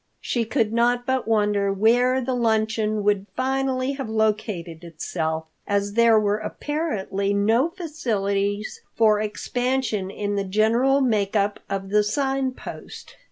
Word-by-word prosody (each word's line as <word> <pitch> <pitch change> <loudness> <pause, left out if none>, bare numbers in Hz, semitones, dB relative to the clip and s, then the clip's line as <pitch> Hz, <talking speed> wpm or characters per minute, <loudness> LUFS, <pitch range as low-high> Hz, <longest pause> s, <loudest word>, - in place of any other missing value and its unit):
She 235 -2 -1
could 225 -2 0
not 240 +1 +2
but 260 -2 -1
wonder 205 -2 +2
where 245 +6 +3
the 260 +1 -2
luncheon 220 -2 0
would 205 -1 +1
finally 265 0 0
have 270 -4 -5
located 210 -6 -1
itself, 160 -1 -3 0.2
as 200 0 0
there 230 -1 +5
were 210 0 +1
apparently 210 -7 -2
no 225 +9 +3
facilities 210 - -2
for 215 -2 +4
expansion 245 -1 -1
in 205 0 -3
the 200 - 0
general 230 +8 +2
make 215 -5 +1
up 205 0 +1
of 195 0 -3
the 210 +1 +3
Sign 270 +4 0
Post. - - -10
220 Hz, 135 wpm, -23 LUFS, 200-255 Hz, 0.2 s, there